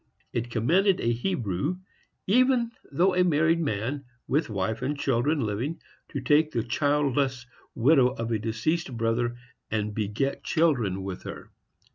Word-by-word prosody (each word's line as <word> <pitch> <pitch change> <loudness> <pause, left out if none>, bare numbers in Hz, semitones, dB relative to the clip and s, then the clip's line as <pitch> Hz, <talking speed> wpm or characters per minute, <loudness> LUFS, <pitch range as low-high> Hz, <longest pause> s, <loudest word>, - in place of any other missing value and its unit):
It 120 +1 -2
commanded 175 - +2
a 120 - +1
Hebrew, 120 - -1 0.5
even 245 +2 +3 0.2
though 180 +7 +3
a 180 0 +4
married 165 0 +3
man, 135 0 -2 0.2
with 150 +1 +1
wife 105 +2 -2
and 140 +3 -1
children 140 +3 +1
living, 115 +9 -2 0.3
to 140 - -4
take 150 +4 +3
the 115 -7 -1
childless 140 -1 0 0.3
widow 130 +1 +5
of 115 -2 -4
a 110 - +1
deceased 120 +6 -2
brother, 115 +1 0 0.3
and 105 -1 -1
beget 110 +6 -2
children 120 - +1
with 95 -1 -5
her. - - -9
130 Hz, 140 wpm, -27 LUFS, 115-155 Hz, 0.5 s, widow